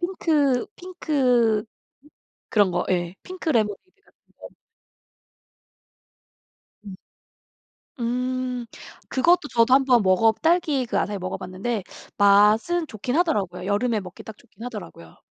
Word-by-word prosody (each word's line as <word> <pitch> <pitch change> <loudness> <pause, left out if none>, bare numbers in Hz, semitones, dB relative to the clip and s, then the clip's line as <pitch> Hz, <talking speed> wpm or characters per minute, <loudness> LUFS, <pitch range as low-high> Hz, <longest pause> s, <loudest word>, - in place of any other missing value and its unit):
핑크 305 -8 +1
핑크 250 - +1 0.8
그런 205 -3 +3
거 175 0 -1
예. 175 0 -1
핑크 370 -2 -7
레모네이드 230 - -2
같은 - - -31 0.2
거. - - -10 2.4
음. 195 -2 -9 1.0
음 250 +1 -2 0.4
그것도 315 +3 +2
저도 235 0 +3
한번 260 -4 +4
먹어 190 +4 +4
딸기 320 -6 +1
그 - - -1
아사이 205 -1 -2
먹어봤는데 185 +4 -4 0.3
맛은 210 +12 +4
좋긴 245 +4 -4
하더라고요. 195 - -1
여름에 215 +2 0
먹기 180 -2 -11
딱 220 -2 -11
좋긴 230 -2 -18
하더라고요. 205 - -9
235 Hz, 245 characters per minute, -23 LUFS, 205-275 Hz, 2.4 s, 한번